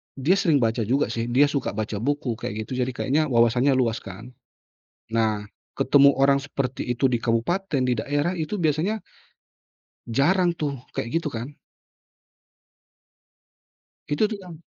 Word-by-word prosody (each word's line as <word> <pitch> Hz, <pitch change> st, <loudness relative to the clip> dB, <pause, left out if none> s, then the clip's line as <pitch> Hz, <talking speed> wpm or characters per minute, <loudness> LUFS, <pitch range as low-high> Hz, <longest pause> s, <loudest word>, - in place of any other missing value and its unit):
dia 165 Hz, +9 st, +2 dB
sering 150 Hz, -9 st, +3 dB
baca 115 Hz, -1 st, 0 dB
juga 135 Hz, +4 st, +1 dB
sih, 115 Hz, 0 st, -2 dB
dia 140 Hz, +4 st, +3 dB
suka 140 Hz, -7 st, -2 dB
baca 105 Hz, -1 st, -3 dB
buku, 125 Hz, -2 st, -2 dB
kayak 110 Hz, -3 st, -4 dB
gitu. 130 Hz, +3 st, -5 dB
Jadi 125 Hz, 0 st, -1 dB
kayaknya 150 Hz, +5 st, +1 dB
wawasannya 125 Hz, +2 st, +3 dB
luas 120 Hz, -3 st, +1 dB
kan. 110 Hz, +7 st, -10 dB, 0.8 s
Nah 110 Hz, -2 st, +1 dB, 0.3 s
ketemu 140 Hz, 0 st, +5 dB
orang 140 Hz, +1 st, +4 dB
seperti 140 Hz, -2 st, -4 dB
itu 130 Hz, +2 st, +1 dB
di 120 Hz, -, +1 dB
kabupaten, 135 Hz, -, 0 dB
di 125 Hz, -2 st, 0 dB
daerah 145 Hz, +7 st, 0 dB
itu 160 Hz, +5 st, -3 dB
biasanya 175 Hz, +4 st, 0 dB, 1.1 s
jarang 175 Hz, +9 st, +2 dB
tuh, 140 Hz, -6 st, -4 dB
kek 115 Hz, -, -3 dB
gitu 165 Hz, +4 st, -1 dB
kan? 125 Hz, +6 st, -6 dB, 2.5 s
Itu 145 Hz, +8 st, +1 dB
tuh 215 Hz, -, -3 dB
kan 175 Hz, -3 st, -10 dB
135 Hz, 145 wpm, -24 LUFS, 115-150 Hz, 2.5 s, ketemu